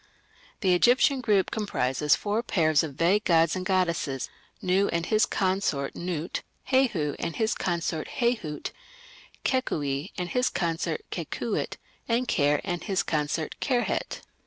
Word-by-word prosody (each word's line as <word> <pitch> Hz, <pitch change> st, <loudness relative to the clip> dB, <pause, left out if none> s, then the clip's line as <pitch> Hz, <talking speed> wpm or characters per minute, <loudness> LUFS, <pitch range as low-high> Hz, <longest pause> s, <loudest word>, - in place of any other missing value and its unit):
The 185 Hz, -4 st, +4 dB
Egyptian 255 Hz, +7 st, +4 dB
group 210 Hz, -5 st, +2 dB
comprises 150 Hz, -, +1 dB
four 210 Hz, +2 st, -1 dB
pairs 160 Hz, -9 st, +3 dB
of 155 Hz, -5 st, -5 dB
vague 180 Hz, +7 st, +3 dB
gods 165 Hz, -1 st, +4 dB
and 185 Hz, -, -3 dB
goddesses 170 Hz, -8 st, 0 dB, 0.3 s
Nu 190 Hz, +2 st, +2 dB
and 170 Hz, 0 st, -1 dB
his 215 Hz, +2 st, +3 dB
consort 185 Hz, -8 st, 0 dB
Nut, 175 Hz, -1 st, -3 dB, 0.3 s
Hehu 215 Hz, -, +2 dB
and 170 Hz, -, -3 dB
his 220 Hz, -1 st, +1 dB
consort 170 Hz, -3 st, -2 dB
Hehut, 225 Hz, -11 st, -1 dB, 0.7 s
Kekui 150 Hz, -, 0 dB
and 180 Hz, -2 st, -2 dB
his 250 Hz, +4 st, +2 dB
consort 165 Hz, -2 st, -1 dB
Kekuit, -, -, -3 dB, 0.3 s
and 240 Hz, +2 st, +1 dB
Kerh 145 Hz, -5 st, +2 dB
and 175 Hz, -3 st, -3 dB
his 195 Hz, -2 st, 0 dB
consort 155 Hz, +1 st, -1 dB
Kerhet. 250 Hz, -4 st, -1 dB
180 Hz, 135 wpm, -27 LUFS, 155-215 Hz, 0.7 s, The